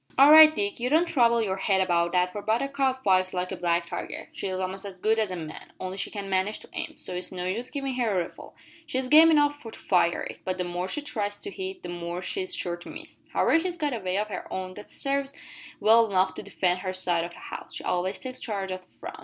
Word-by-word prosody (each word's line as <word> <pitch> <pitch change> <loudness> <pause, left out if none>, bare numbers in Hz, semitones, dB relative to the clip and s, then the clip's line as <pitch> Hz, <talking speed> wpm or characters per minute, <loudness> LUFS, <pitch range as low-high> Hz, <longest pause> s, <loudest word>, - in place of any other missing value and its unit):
"All 275 +3 +8
right 310 0 +11
Dick; 205 +1 -2
you 245 +1 0
don't 320 +5 +4
trouble 235 -7 +3
your 190 -2 -1
head 195 0 +1
about 170 -2 +2
that 180 0 +2
for 205 - -5
Buttercup 265 +4 0
fights 185 -2 +3
like 180 0 -2
a - - -2
black 170 0 0
tiger. - - -6
She's 195 - -4
a'most 185 +1 -3
as 195 -2 -7
good 220 +4 +2
as 215 -2 +1
a 185 - -4
man 160 -3 -8
only 185 0 -4
she 195 - -4
can't 200 -2 -6
manage 195 +2 0
to - - -13
aim, - - -5
so - - -5
it's 180 - -4
no 180 -1 -4
use 225 +7 -2
givin' 275 -2 -3
her 230 -7 +1
a - - +1
rifle. - - -12 0.3
She's 260 -3 -1
game 315 +3 +9
enough 290 -2 +3
to 225 - -8
fire 175 -2 +1
it, - - -7
but 185 0 -2
the 180 - -1
more 175 +1 -3
she 300 +9 -2
tries 210 -7 -3
to 400 - -5
hit, 380 -1 -6
the - - -6
more 175 0 -4
she's 370 - -2
sure 175 - -2
to 175 - -12
miss. - - -11
However 325 - +3
she's 350 +1 -3
got 295 -4 -1
a 235 - -2
way 185 -1 -2
of 210 +1 -1
her 195 - -6
own 185 0 -4
that 210 +2 -11
sarves 275 0 -2 0.4
well 225 +1 +6
enough 190 -2 +2
to - - -6
defend 185 -3 0
her 185 0 -3
side 175 -2 0
o' - - -3
the 170 - -14
house. - - -8
She - - -6
always 185 +2 -1
takes 255 -1 -6
charge 195 -4 -3
o' 185 - -2
the 185 0 -21
front. - - -10
200 Hz, 260 wpm, -27 LUFS, 185-260 Hz, 0.4 s, right